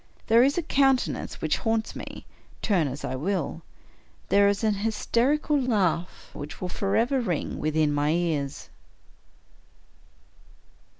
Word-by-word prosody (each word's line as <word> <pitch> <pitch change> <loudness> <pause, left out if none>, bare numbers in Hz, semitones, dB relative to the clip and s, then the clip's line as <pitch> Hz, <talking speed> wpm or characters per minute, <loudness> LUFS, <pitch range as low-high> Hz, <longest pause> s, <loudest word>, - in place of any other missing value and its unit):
There 230 +1 +5
is 280 +4 +2
a 345 - +1
countenance 270 -4 +1
which - - +1
haunts 225 -1 -1
me, - - -8 0.4
turn 180 -8 +2
as 135 +2 -5
I 130 - -3
will. 165 +2 -2 0.7
There 200 0 +5
is 200 +2 0
an 215 -1 +3
hysterical 240 +8 +1
laugh 190 -8 -1
which 145 +1 -8
will 180 - -4
forever 230 +8 +1
ring 180 -10 -2
within 155 -1 +1
my 145 +1 +1
ears. 155 -4 -1
200 Hz, 125 wpm, -26 LUFS, 155-235 Hz, 0.7 s, There